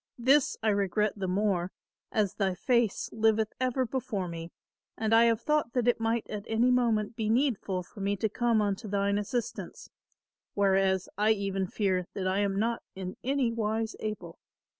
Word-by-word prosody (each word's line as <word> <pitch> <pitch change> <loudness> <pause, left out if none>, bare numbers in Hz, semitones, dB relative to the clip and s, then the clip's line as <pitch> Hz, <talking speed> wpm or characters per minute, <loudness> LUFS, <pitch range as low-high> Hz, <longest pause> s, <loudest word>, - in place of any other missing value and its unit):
This 265 +4 +3
I 220 - +3
regret 205 +1 +1
the 195 -2 -3
more 185 -1 0 0.4
as 210 -4 +1
thy 190 -3 0
face 235 +1 +1
liveth 220 -1 +2
ever 255 0 +1
before 230 -6 -3
me 165 0 -7 0.5
and 220 0 0
I 230 +1 +7
have 230 -1 +3
thought 300 -2 0
that 245 -2 0
it 240 - +3
might 225 0 0
at 210 -2 -5
any 230 +3 +3
moment 230 -3 +1
be 220 -2 -2
needful 220 -7 +1
for 200 - -15
me 200 +1 0
to 210 +3 0
come 230 0 +1
unto 205 +2 -2
thine 200 0 +1
assistance, 230 +3 -4 0.6
whereas 195 -2 +2
I 215 +1 +5
even 195 -2 -2
fear 185 -3 0
that 190 -2 -2
I 190 +2 +1
am 200 -1 0
not 230 +3 0
in 185 -1 -6
any 265 -2 +1
wise 220 0 -1
able. 190 -6 -5
215 Hz, 175 wpm, -29 LUFS, 195-230 Hz, 0.6 s, I